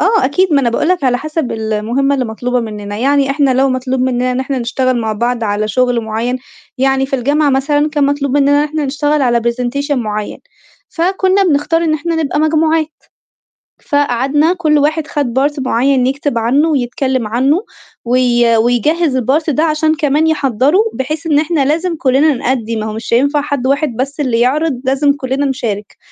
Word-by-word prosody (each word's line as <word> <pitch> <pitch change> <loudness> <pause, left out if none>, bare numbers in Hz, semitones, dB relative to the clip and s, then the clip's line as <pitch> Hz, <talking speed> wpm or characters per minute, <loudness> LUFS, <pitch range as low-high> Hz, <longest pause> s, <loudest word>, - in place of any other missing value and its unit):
آه 425 +1 +2
أكيد، 340 +6 +1
ما 285 - +4
أنا 240 -3 +1
باقول 235 - 0
لك 360 -5 +1
على 245 -1 +2
حَسَب 310 -2 -3
المهمة 225 +5 -1
اللي 260 - -1
مطلوبة 245 +2 -2
منّنا، 210 -2 -6
يعني 275 +2 +2
إحنا 280 -1 +2
لو 270 +2 +2
مطلوب 255 0 -2
منّنا 255 0 0
إن 250 - -1
إحنا 265 0 -2
نشتغل 250 +1 -1
مع 220 -1 -2
بعض 235 +2 -1
على 210 0 -1
شُغل 245 +2 +1
معيّن، 225 +3 -3 0.4
يعني 270 0 +1
في 270 - -2
الجامعة 285 +4 +1
مثلًا 290 +3 +1
كان 295 -2 +1
مطلوب 280 -1 -1
منّنا 280 0 +3
إن 295 - +2
إحنا 300 0 -3
نشتغل 290 +2 0
على 240 -2 +2
presentation 250 +5 -2
معيّن، 215 -4 -4 0.5
فكُنّا 375 +3 +1
بنختار 330 0 +1
إن 315 -2 +1
إحنا 330 +2 -2
نبقى 295 0 -1
مجموعات. 315 0 +2 1.0
فقعدنا 285 +3 +1
كل 315 -5 +1
واحد 305 +1 0
خَد 265 -4 -1
part 290 +2 0
معيّن 260 0 +1
يكتب 275 -1 -2
عنّه 265 +8 +2
ويتكلِّم 260 -3 -1
عّنه 270 - +1 0.4
وي 240 -1 +2
ويجهّز 260 +6 +1
الpart 275 +6 0
ده 305 +2 +1
عشان 310 0 +1
كمان 300 +1 +1
يحضّروا، 290 - +2
بحيث 285 +4 -4
إن 295 -2 +3
إحنا 305 -2 0
لازم 335 +5 0
كُلّنا 290 +1 +2
نؤدّي، 245 -3 -2
ما 215 -1 -3
هو 215 - -4
مش 225 +1 -5
هينفع 285 +4 +2
حد 285 -3 -2
واحد 280 -2 0
بس 275 +5 -4
اللي 250 -5 0
يعرض 265 +2 0
لازم 275 +2 +2
كُلّنا 275 0 -2
نشارك، 220 -6 -4
270 Hz, 180 wpm, -14 LUFS, 245-300 Hz, 1.0 s, ما